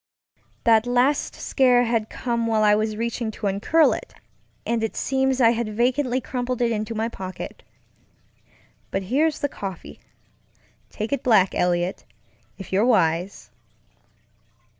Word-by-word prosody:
That 225 0 +4
last 250 +4 +1
scare 250 -3 +3
had 230 -2 -1
come 235 -2 -2
while 220 -1 +2
I 210 -1 +5
was 215 0 0
reaching 235 0 -2
to 215 0 -7
uncurl 205 +12 +3
it, - - -8 0.5
and 230 -1 -1
it 225 - -3
seems 265 -1 0
I 230 -2 +6
had 235 -1 -2
vacantly 255 +2 +1
crumpled 250 -1 -3
it 240 -1 +1
into 215 0 -3
my 220 +1 -1
pocket. 190 -5 -8 1.3
But 195 - -2
here's 290 +9 0
the 285 - 0
coffeeŌĆötake 185 - -8 1.1
it 280 - -1
black, 205 -6 +3
Eliot, 175 +1 0 0.5
if 195 -1 -9
you're 195 +3 +3
wise. 180 - +1
230 Hz, 135 wpm, -23 LUFS, 210-250 Hz, 1.3 s, I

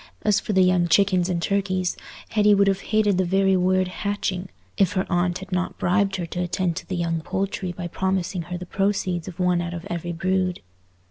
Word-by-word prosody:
As 210 -2 +3
for 210 - -3
the 190 -1 +5
young 180 -1 +3
chickens 185 +1 +3
and 175 -2 0
turkeys, 185 0 0 0.3
Hetty 210 -1 +4
would 200 0 +4
have 195 0 +1
hated 210 -3 +2
the - - +4
very 195 +1 +3
word 185 0 +2
"hatching," 190 -1 -3 0.3
if 195 -3 +2
her 185 -1 0
aunt 175 0 +1
had 190 0 -10
not 180 0 -1
bribed 195 +1 +1
her 180 -2 -3
to 175 +2 -4
attend 175 -1 -1
to - - -6
the 185 - -3
young 165 -2 -1
poultry 190 +1 -2
by 175 0 -5
promising 190 0 -1
her 180 - -3
the 180 - -7
proceeds 190 -3 -1
of 180 -1 -8
one 180 -1 +2
out 175 0 -4
of 170 +1 -7
every 175 0 -3
brood. 185 +1 -1
185 Hz, 210 wpm, -24 LUFS, 175-195 Hz, 0.3 s, the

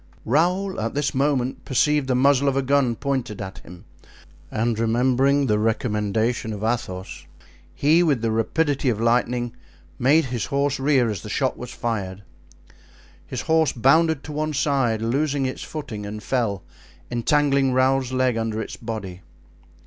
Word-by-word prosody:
Raoul 180 - +1
at 115 +3 -3
this 145 -1 0
moment 135 -2 0
perceived 145 +1 +1
the 130 - +1
muzzle 140 +1 +3
of 135 -1 +1
a 135 - +1
gun 130 -3 +2
pointed 130 -5 -3
at 95 -1 -7
him, 90 0 -14 0.6
and 115 0 -1
remembering 130 +5 +2
the 105 -4 +1
recommendation 110 +1 0
of 105 0 -6
Athos, 110 -5 -3 0.5
he, 155 +4 +4
with 145 -9 +1
the 115 - +1
rapidity 140 +5 0
of 110 -3 -1
lightning, 120 +1 +1 0.4
made 145 +5 +4
his 125 -3 -3
horse 140 0 0
rear 135 -3 +3
as 100 -4 -5
the 105 - -8
shot 130 +3 0
was 125 - -8
fired. 100 -6 -4 1.0
His 125 - -4
horse 160 +3 +2
bounded 150 +4 +3
to 150 - -8
one 155 +1 -2
side, 135 -6 +1
losing 140 +3 0
its 130 - -4
footing, 115 -9 -6
and 105 +1 -7
fell, 115 -7 -1 0.5
entangling 140 +2 +2
Raoul's 130 0 +2
leg 130 -2 +1
under 110 -1 -2
its 110 - -6
body. 105 -6 -6
125 Hz, 155 wpm, -23 LUFS, 115-140 Hz, 1.0 s, he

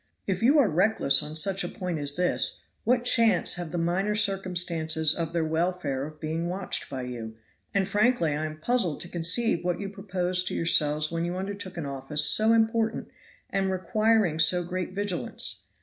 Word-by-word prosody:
If 190 -2 -2
you 270 +7 +4
are 280 -6 +5
reckless 175 -6 +2
on 150 +1 -6
such 195 +4 +3
a - - -3
point 180 -4 -4
as 145 0 -3
this, 180 - 0 0.2
what 245 0 +2
chance 230 -7 +3
have 175 -2 -4
the 175 - -3
minor 185 +5 0
circumstances 175 -6 +1
of 165 -2 -3
their 170 -1 0
welfare 160 -4 -1
of 155 0 -13
being 160 +2 -3
watched 185 +1 -2
by 130 -2 -5
you? 115 -3 -7 0.4
and 195 -2 0
frankly 205 -4 +2
I 155 +1 -2
am 155 0 -8
puzzled 185 -2 0
to - - -4
conceive 175 +4 +1
what 175 -1 -1
you 200 -1 -4
proposed 185 -2 -1
to - - -3
yourselves 155 -2 +2
when 165 0 -2
you 175 +1 -3
undertook 190 -1 -6
an 165 - -4
office 140 +2 0
so 220 +1 +5
important 225 0 +1 0.4
and 195 -1 0
requiring 190 -1 +1
so 175 +2 +4
great 180 +1 -4
vigilance. 200 -3 -2
180 Hz, 180 wpm, -26 LUFS, 160-200 Hz, 0.4 s, are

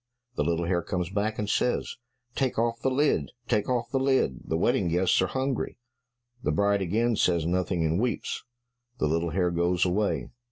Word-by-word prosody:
The - - +1
little 85 +2 0
hare 85 0 +1
comes 90 0 -3
back 105 +2 -1
and 105 - -2
says, 125 +4 0 0.4
"Take 130 -1 -1
off 115 0 0
the 135 - +2
lid, 145 +3 +1 0.2
take 105 -1 +1
off 120 -2 -1
the 135 - +1
lid, 130 - +2
the 80 - -1
wedding 105 +1 +2
guests 90 +3 +3
are 95 - +2
hungry." 130 +2 -2 0.6
The 75 - 0
bride 100 +5 +2
again 110 +6 +1
says 85 -5 +2
nothing, 90 -1 0
and 80 +3 +1
weeps. 120 -1 -2 0.5
The - - 0
little 85 +2 0
hare 90 +1 +1
goes 85 +1 +1
away. 90 - 0
95 Hz, 185 wpm, -27 LUFS, 85-120 Hz, 0.6 s, guests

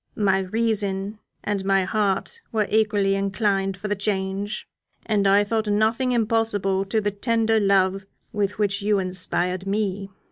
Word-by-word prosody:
My 195 -2 +2
reason 205 0 -1 0.2
and 205 -2 -2
my 195 0 +2
heart 210 - -1
were 215 -2 +1
equally 210 -2 +2
inclined 195 -1 0
for 210 - -5
the 205 - 0
change, 195 0 -3 0.4
and 205 -3 +1
I 200 +1 +5
thought 220 +1 -1
nothing 220 +5 +1
impossible 215 -4 +1
to 205 +3 0
the 205 -1 -1
tender 225 +1 +1
love 195 -1 +2 0.3
with 205 -1 -1
which 205 -1 0
you 205 0 +2
inspired 185 0 -2
me. 200 -1 -2
205 Hz, 145 wpm, -23 LUFS, 195-215 Hz, 0.4 s, I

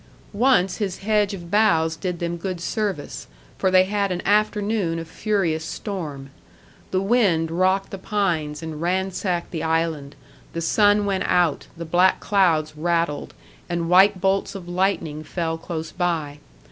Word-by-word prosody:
Once 205 -4 +3
his 195 -4 -2
hedge 210 -1 +2
of 175 -3 -8
boughs 165 -7 +3
did 180 +1 -3
them 170 0 -3
good 180 +1 -4
service, 195 -4 -3 0.3
for 190 - +2
they 185 0 +6
had 200 0 -1
an 180 - -2
afternoon 210 -3 +1
of 165 0 -6
furious 170 -5 -1
storm. 155 -8 -6 0.6
The 185 0 0
wind 195 -8 +2
rocked 185 +3 +1
the 195 - -6
pines 170 -7 -1
and 160 -1 -6
ransacked 185 0 -1
the 160 - -3
island, 160 -3 -1 0.4
the 165 - -3
sun 205 +4 +3
went 195 -2 -1
out, 175 -5 +2
the 170 - -5
black 180 +3 +3
clouds 165 -6 +2
rattled, 165 -1 -1 0.3
and 170 0 -2
white 190 +1 +6
bolts 195 +1 0
of 185 -3 -8
lightning 175 -4 -1
fell 165 -1 -3
close 160 -1 -5
by. 160 -5 -2
180 Hz, 150 wpm, -23 LUFS, 165-195 Hz, 0.6 s, they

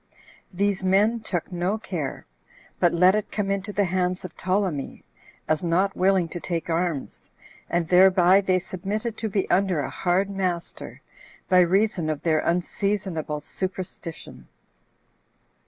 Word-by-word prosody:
These 200 0 0
men 205 +5 +3
took 185 -6 -4
no 180 +4 -1
care, 170 -10 -5 0.5
but 175 - +4
let 180 +2 +5
it 215 0 -2
come 200 -2 -1
into 200 +1 -2
the 205 0 +1
hands 180 0 -1
of 180 - -9
Ptolemy, 185 -6 -2 0.4
as 155 +1 0
not 185 +3 +1
willing 185 -2 +2
to 175 - -5
take 170 -1 -3
arms, 165 -4 -3 0.4
and 170 -1 0
thereby 185 +1 +6
they 185 -1 +2
submitted 205 +5 -4
to 220 - -3
be 195 -1 -1
under 185 -3 +2
a 140 - -3
hard 185 +2 +1
master, 185 -3 -4 0.5
by 185 - +6
reason 180 -1 +2
of 155 -2 -3
their 160 -2 +2
unseasonable 175 -3 -1
superstition." 185 0 -6
185 Hz, 140 wpm, -25 LUFS, 170-195 Hz, 0.5 s, thereby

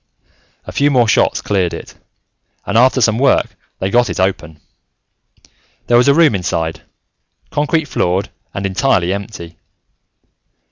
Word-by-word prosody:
A - - -7
few 145 +1 +2
more 125 -5 +3
shots - - +1
cleared 95 -4 -1
it, - - -10 0.7
and - - -3
after 130 +2 +4
some 115 0 +2
work, 135 0 +2 0.2
they 95 +1 -3
got 120 +2 +3
it - - -4
open. 90 -4 -2 1.3
There 120 - +2
was 120 - +3
a 140 - +6
room 165 -6 +4
inside, 80 -3 -2 0.7
concrete 150 +2 0
floored 90 -4 -1 0.2
and 95 - -4
entirely 95 -3 +1
empty. 95 -5 -8
100 Hz, 135 wpm, -16 LUFS, 90-130 Hz, 1.3 s, a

